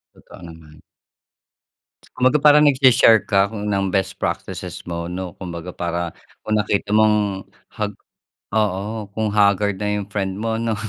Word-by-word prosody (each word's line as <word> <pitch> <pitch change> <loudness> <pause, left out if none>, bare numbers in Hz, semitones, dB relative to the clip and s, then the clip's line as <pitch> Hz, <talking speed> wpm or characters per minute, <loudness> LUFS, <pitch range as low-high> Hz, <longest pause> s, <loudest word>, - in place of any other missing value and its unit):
Totoo - - -16
naman. 80 -2 -14 1.4
Kumbaga 130 +4 +3
parang 150 0 +6
nagshi-share 130 -5 +5
ka 100 0 +2
ng 105 -2 -2
best 95 -1 -1
practices - - -4
mo, 85 -1 -4
'no. 90 0 -5
Kumbaga, 90 -1 -7
para 85 -1 -3 0.3
kung 110 - -2
nakita 100 0 -1
mong 105 -3 +2 0.2
hag 105 -1 -4 0.6
oo, 105 +1 -1
kung 110 -1 -1
haggard 100 -1 +2
na 105 0 -2
'yung 100 - -5
friend 95 -2 -2
mo 110 0 -2
'no, 115 -1 -1
100 Hz, 140 wpm, -21 LUFS, 95-110 Hz, 1.4 s, parang